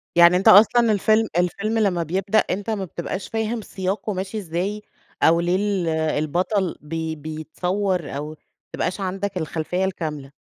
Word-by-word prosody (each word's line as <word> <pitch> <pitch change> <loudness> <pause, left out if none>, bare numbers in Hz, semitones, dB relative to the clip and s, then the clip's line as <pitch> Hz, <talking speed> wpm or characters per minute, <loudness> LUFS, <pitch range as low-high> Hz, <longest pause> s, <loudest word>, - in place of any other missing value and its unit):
يعني 175 +1 +7
أنت 190 - 0
أصلًا 225 +3 +7
الفيلم 215 +2 +3
الفيلم 200 +5 0
لما 185 -5 +1
بيبدأ 190 +6 +1
أنت 205 +3 -2
ما 205 -3 -1
بتبقاش 185 +2 -5
فاهم 225 +1 -2
سِياقه 195 +2 -3
ماشي 190 +3 -4
إزاي 195 +3 -3 0.4
أو 170 +1 +5
ليه 175 +1 +1
ال 195 -3 0 0.4
البطل 180 +4 0
بي 160 +1 -4
بيتصوّر 165 +3 -3
أو 150 +1 -4
ما 155 - -9 0.4
تبقاش 185 - -2
عندك 195 0 -3
الخلفية 165 +3 -2
الكاملة؟ 150 -7 -4
185 Hz, 150 wpm, -22 LUFS, 165-205 Hz, 0.4 s, يعني